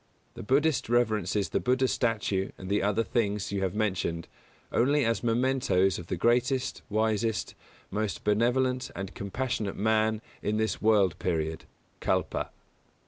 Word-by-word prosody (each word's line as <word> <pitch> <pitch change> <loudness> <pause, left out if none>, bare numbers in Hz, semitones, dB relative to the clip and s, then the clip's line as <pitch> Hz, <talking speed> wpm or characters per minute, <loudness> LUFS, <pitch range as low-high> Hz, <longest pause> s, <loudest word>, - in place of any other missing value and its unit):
The - - -8
Buddhist 140 +1 +1
reverences 110 -5 +1
the - - 0
Buddha's 130 +1 +2
statue 105 -5 0
and 95 - -8
the 105 - +2
other 105 +3 +1
things 105 -4 -1
you 100 -1 -1
have 95 0 -1
mentioned, 95 -6 -1 0.4
only 140 +2 +3
as 115 0 +1
mementoes 115 -6 +2
of 85 - -9
the 90 - -2
greatest, 125 +5 +1
wisest, 110 0 0 0.4
most 105 -1 -2
benevolent 125 +4 +1
and 95 0 -5
compassionate 105 0 -3
man 110 +1 +1 0.2
in 105 +1 0
this 110 0 -1
world 105 -5 +3
period 80 -2 -2 0.3
(Kalpa). - - -1
110 Hz, 140 wpm, -28 LUFS, 100-120 Hz, 0.4 s, only